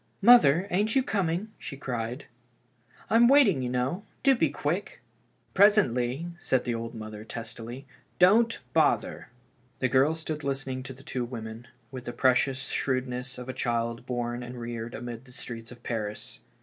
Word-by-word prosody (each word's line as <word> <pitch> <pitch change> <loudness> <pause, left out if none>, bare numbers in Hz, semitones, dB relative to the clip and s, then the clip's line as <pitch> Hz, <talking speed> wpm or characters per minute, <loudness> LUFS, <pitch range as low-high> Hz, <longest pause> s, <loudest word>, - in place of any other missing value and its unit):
" - - -41
Mother, 200 - +7
ain't 210 +4 +1
you 265 - +4
coming? 195 -1 -1
" - - -36
she 140 - -7
cried. 125 0 -4 0.4
" 120 -1 -29
I'm 230 +2 +6
waiting, 240 - +5
you 125 - -2
know; 125 +10 -1 0.2
do 275 - +6
be 160 - +2
quick." 155 +7 -3 0.3
" - - -40
Presently," 150 - +3
said 130 -6 +1
the 120 - -1
mother, 110 -2 -6
testily. 115 +3 -7 0.2
" - - -39
Don't 225 +3 +3 0.2
bother." - - +1 0.5
The 130 - 0
girl 135 +5 +3
stood 155 -2 -4
listening 135 -1 -2
to 135 0 -7
the 135 +2 -14
two 130 -3 -3
women, 115 -1 -7 0.2
with 130 -2 -8
the 120 - -5
preeocious 130 +1 +2
shrewdness 130 -1 -2
of 125 0 -8
a 130 - -4
child 115 0 -2
born 120 -1 -2
and 120 0 -7
reared 120 0 -5
amid 120 +1 -7
the 125 - -16
streets 115 -3 -7
of 120 -1 -13
Paris. 110 -3 -4
130 Hz, 175 wpm, -28 LUFS, 120-155 Hz, 0.5 s, Mother